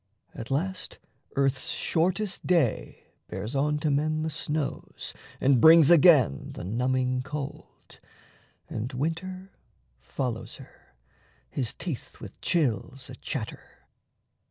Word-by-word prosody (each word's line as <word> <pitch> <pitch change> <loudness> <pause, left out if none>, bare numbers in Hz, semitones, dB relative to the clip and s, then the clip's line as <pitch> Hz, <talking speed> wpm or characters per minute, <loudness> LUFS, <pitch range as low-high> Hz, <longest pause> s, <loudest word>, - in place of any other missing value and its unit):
At 115 - -7
last 185 +7 -2 0.4
earth's 135 -1 +1
Shortest 185 +4 -1
Day 165 -10 +1 0.2
Bears 100 +7 -5
on 150 +2 +1
to 155 -2 +1
men 155 +2 +1
the 160 - -2
snows 150 0 -4 0.3
and 130 -3 +4
brings 160 -1 +8
again 150 - +5
The - - -7
numbing 125 +5 0
cold. 140 +1 -8 0.7
And 115 +4 -4
Winter 185 +7 -3 0.5
follows 120 - -4
her, - - -17 0.6
His 125 -5 -3
teeth 160 -9 -6
with - - -11
chills 130 - -1
a - - -8
chatter. 125 -4 -5
140 Hz, 110 wpm, -27 LUFS, 125-165 Hz, 0.7 s, brings